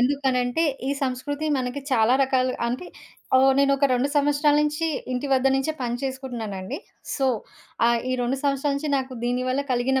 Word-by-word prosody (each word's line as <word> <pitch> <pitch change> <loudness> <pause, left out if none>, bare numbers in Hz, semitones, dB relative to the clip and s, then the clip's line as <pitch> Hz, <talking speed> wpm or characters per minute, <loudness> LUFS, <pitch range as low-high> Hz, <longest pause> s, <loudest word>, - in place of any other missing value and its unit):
ఎందుకనంటే 260 +2 +1 0.2
ఈ - - +1
సంస్కృతి 275 +4 -2
మనకి 255 +2 -3
చాలా 230 +1 +4
రకాలు 255 -1 +1 0.2
అంటే 255 +9 -4 0.5
ఓ - - +5 0.2
నేనొక 275 0 +4
2 255 +3 +1
సంవత్సరాల 290 +1 +3
నుంచి 300 +2 0 0.3
ఇంటి 255 +3 -2
వద్ద 265 0 +3
నుంచే 270 +4 0
పని 240 0 -1
చేసుకుంటున్నానండి. 235 - -5 0.4
సో, 270 -2 +1 0.6
ఆహ్, 235 -1 +3
ఈ - - +1
2 255 +3 -1
సంవత్సరాల 280 0 +1
నుంచి 295 +1 -3
నాకు 260 0 -5
దీని 245 +1 0
వల్ల 260 +2 0
కలిగిన 260 +2 +1
265 Hz, 160 wpm, -24 LUFS, 250-280 Hz, 0.6 s, ఓ